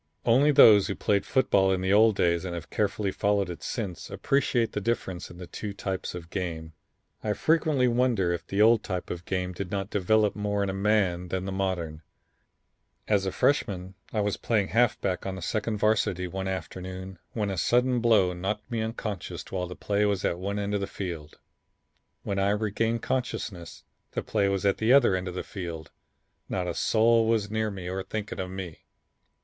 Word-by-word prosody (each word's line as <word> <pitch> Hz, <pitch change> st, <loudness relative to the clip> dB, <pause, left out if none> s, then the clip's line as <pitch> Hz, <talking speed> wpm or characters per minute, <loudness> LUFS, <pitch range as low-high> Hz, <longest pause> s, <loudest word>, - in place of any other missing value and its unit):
"Only 135 Hz, +6 st, +5 dB
those 110 Hz, -8 st, +8 dB
who 100 Hz, -, -2 dB
played 100 Hz, -1 st, 0 dB
football 100 Hz, -7 st, +3 dB
in 95 Hz, -, +1 dB
the 95 Hz, +1 st, +1 dB
old 110 Hz, 0 st, +6 dB
days 85 Hz, -2 st, +2 dB
and 90 Hz, -2 st, -4 dB
have 85 Hz, -2 st, -8 dB
carefully 105 Hz, -1 st, 0 dB
followed 100 Hz, -2 st, +1 dB
it 85 Hz, -, -8 dB
since 100 Hz, -8 st, -4 dB
appreciate 125 Hz, -5 st, +1 dB
the 105 Hz, -, -3 dB
difference 95 Hz, -5 st, -2 dB
in 85 Hz, -, -12 dB
the 90 Hz, -, -7 dB
two 105 Hz, +3 st, -6 dB
types 95 Hz, -2 st, -4 dB
of 85 Hz, -1 st, -9 dB
game. 80 Hz, -4 st, -4 dB, 0.5 s
I 105 Hz, -, 0 dB
frequently 155 Hz, -2 st, +2 dB
wonder 120 Hz, -7 st, +2 dB
if 85 Hz, -, -5 dB
the 100 Hz, +2 st, +3 dB
old 115 Hz, 0 st, +5 dB
type 90 Hz, -3 st, -4 dB
of 85 Hz, 0 st, -6 dB
game 90 Hz, -1 st, -2 dB
did 90 Hz, 0 st, -5 dB
not 100 Hz, +1 st, -3 dB
develop 105 Hz, +2 st, +2 dB
more 105 Hz, -1 st, -1 dB
in 100 Hz, -, -1 dB
a -, -, -5 dB
man 95 Hz, -3 st, +1 dB
than 95 Hz, +1 st, -3 dB
the 95 Hz, -, -3 dB
modern. 90 Hz, -5 st, -2 dB, 1.1 s
As 100 Hz, -2 st, +2 dB
a -, -, 0 dB
freshman 95 Hz, -10 st, 0 dB, 0.2 s
I 110 Hz, -, 0 dB
was 105 Hz, -1 st, -1 dB
playing 105 Hz, -4 st, 0 dB
halfback 105 Hz, -6 st, +1 dB
on 95 Hz, -, -3 dB
the 95 Hz, -, -7 dB
second 110 Hz, +3 st, -1 dB
Varsity 100 Hz, -4 st, +1 dB
one 95 Hz, +2 st, -4 dB
afternoon 95 Hz, 0 st, -6 dB
when 105 Hz, -3 st, -1 dB
a -, -, -2 dB
sudden 125 Hz, +3 st, +2 dB
blow 110 Hz, -6 st, +4 dB
knocked 100 Hz, +6 st, -4 dB
me 115 Hz, -2 st, -1 dB
unconscious 110 Hz, -2 st, -4 dB
while 90 Hz, -2 st, -2 dB
the 90 Hz, -, -8 dB
play 105 Hz, 0 st, 0 dB
was 100 Hz, -2 st, 0 dB
at 85 Hz, -, 0 dB
one 100 Hz, +2 st, -3 dB
end 100 Hz, 0 st, -2 dB
of 100 Hz, -, 0 dB
the 100 Hz, -, -2 dB
field. 85 Hz, -7 st, -6 dB, 0.9 s
When 100 Hz, -1 st, -2 dB
I 100 Hz, +1 st, +2 dB
regained 110 Hz, +2 st, 0 dB
consciousness 110 Hz, -9 st, -3 dB, 0.3 s
the -, -, -2 dB
play 100 Hz, -2 st, +1 dB
was 100 Hz, 0 st, -1 dB
at 100 Hz, -, +3 dB
the 110 Hz, +3 st, +4 dB
other 130 Hz, -8 st, +5 dB
end 95 Hz, 0 st, -3 dB
of 90 Hz, -, -5 dB
the -, -, -3 dB
field, 85 Hz, -5 st, -7 dB, 0.6 s
not 90 Hz, -1 st, -1 dB
a 90 Hz, -, -2 dB
soul 115 Hz, +3 st, +3 dB
was 110 Hz, -2 st, +1 dB
near 110 Hz, 0 st, 0 dB
me 95 Hz, -3 st, -7 dB
or 95 Hz, +1 st, -3 dB
thinking 105 Hz, +2 st, -5 dB
of 95 Hz, -1 st, -3 dB
me. 95 Hz, -4 st, -7 dB
100 Hz, 200 wpm, -27 LUFS, 90-110 Hz, 1.1 s, those